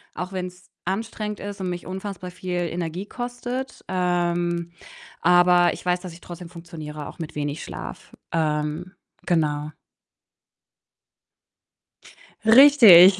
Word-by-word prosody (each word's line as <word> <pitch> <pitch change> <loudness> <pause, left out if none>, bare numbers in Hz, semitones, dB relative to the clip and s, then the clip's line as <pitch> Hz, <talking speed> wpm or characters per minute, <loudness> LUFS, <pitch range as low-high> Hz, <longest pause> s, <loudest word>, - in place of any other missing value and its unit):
auch 180 +1 -4
wenn's 180 0 -6 0.2
anstrengend 210 +2 -3
ist 205 0 -6
und 185 - -1
mich 175 -1 -5
unfassbar 185 -1 -6
viel 180 0 -3
Energie 170 +2 -3
kostet. 245 +2 -5
Ähm, 175 -1 0 0.5
aber 175 0 +5
ich - - -10
weiß, 180 0 +2
dass 180 -2 -8
ich 170 - -14
trotzdem 175 0 -9
funktioniere, 160 -4 -8
auch - - -13
mit 160 -2 -6
wenig 145 0 -3
Schlaf. - - -8 0.2
Ähm, 155 +2 -1 0.3
genau. 150 -3 +1 2.7
Richtig. 220 -7 +9
180 Hz, 115 wpm, -24 LUFS, 170-190 Hz, 2.7 s, Richtig